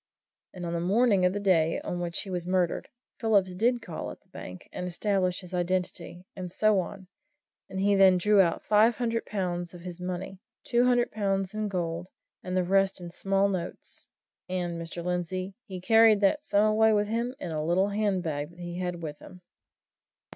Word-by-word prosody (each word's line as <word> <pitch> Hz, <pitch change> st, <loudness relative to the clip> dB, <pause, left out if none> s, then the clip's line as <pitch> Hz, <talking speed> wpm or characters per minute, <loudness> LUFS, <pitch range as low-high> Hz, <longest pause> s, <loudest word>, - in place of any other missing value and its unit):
And 180 Hz, -1 st, -7 dB
on 170 Hz, -, -3 dB
the 170 Hz, -, -1 dB
morning 200 Hz, +2 st, +3 dB
of 180 Hz, -, +3 dB
the 205 Hz, -, -2 dB
day 170 Hz, -5 st, +2 dB
on 175 Hz, -, -4 dB
which 170 Hz, -1 st, -2 dB
he 195 Hz, -, -7 dB
was 175 Hz, -1 st, -3 dB
murdered, 180 Hz, -2 st, 0 dB, 0.3 s
Phillips 200 Hz, -5 st, +2 dB
did 235 Hz, +6 st, +1 dB
call 165 Hz, -, -5 dB
at -, -, -10 dB
the -, -, -35 dB
bank 90 Hz, 0 st, -9 dB
and 180 Hz, -, -4 dB
established 185 Hz, 0 st, 0 dB
his 180 Hz, 0 st, -12 dB
identity, 180 Hz, 0 st, -2 dB
and 180 Hz, -2 st, -6 dB
so 215 Hz, +1 st, +3 dB
on, 190 Hz, +1 st, -6 dB, 0.6 s
and 190 Hz, -, -4 dB
he 200 Hz, +1 st, +3 dB
then 190 Hz, -2 st, +6 dB
drew 205 Hz, +2 st, +5 dB
out 170 Hz, -3 st, 0 dB
five 220 Hz, +2 st, +4 dB
hundred 230 Hz, -2 st, -2 dB
pounds 175 Hz, -3 st, -3 dB
of 175 Hz, -, -10 dB
his 180 Hz, 0 st, -7 dB
money 185 Hz, +1 st, -5 dB, 0.2 s
two 240 Hz, 0 st, +2 dB
hundred 245 Hz, -1 st, +3 dB
pounds 195 Hz, -2 st, -1 dB
in 215 Hz, 0 st, -2 dB
gold, 175 Hz, -2 st, -3 dB, 0.3 s
and 185 Hz, 0 st, -3 dB
the 185 Hz, -, +3 dB
rest 195 Hz, +1 st, +2 dB
in 175 Hz, -1 st, -8 dB
small 195 Hz, +2 st, +1 dB
notes; 185 Hz, -3 st, -4 dB, 0.4 s
and, 175 Hz, -2 st, -2 dB
Mr. 170 Hz, +1 st, -6 dB
Lindsey, 180 Hz, +2 st, -2 dB
he 190 Hz, -4 st, -7 dB
carried 225 Hz, +2 st, +6 dB
that 250 Hz, +10 st, +3 dB
sum 205 Hz, -6 st, +3 dB
away 220 Hz, +1 st, +4 dB
with 205 Hz, 0 st, +2 dB
him 235 Hz, +4 st, -2 dB
in 175 Hz, -, -5 dB
a 155 Hz, -1 st, -2 dB
little 180 Hz, +5 st, +2 dB
handbag 185 Hz, -8 st, -1 dB
that 170 Hz, 0 st, -18 dB
he 175 Hz, 0 st, -5 dB
had 180 Hz, -2 st, -3 dB
with 150 Hz, -2 st, -6 dB
him." 180 Hz, -1 st, -13 dB
185 Hz, 195 wpm, -28 LUFS, 175-205 Hz, 0.6 s, then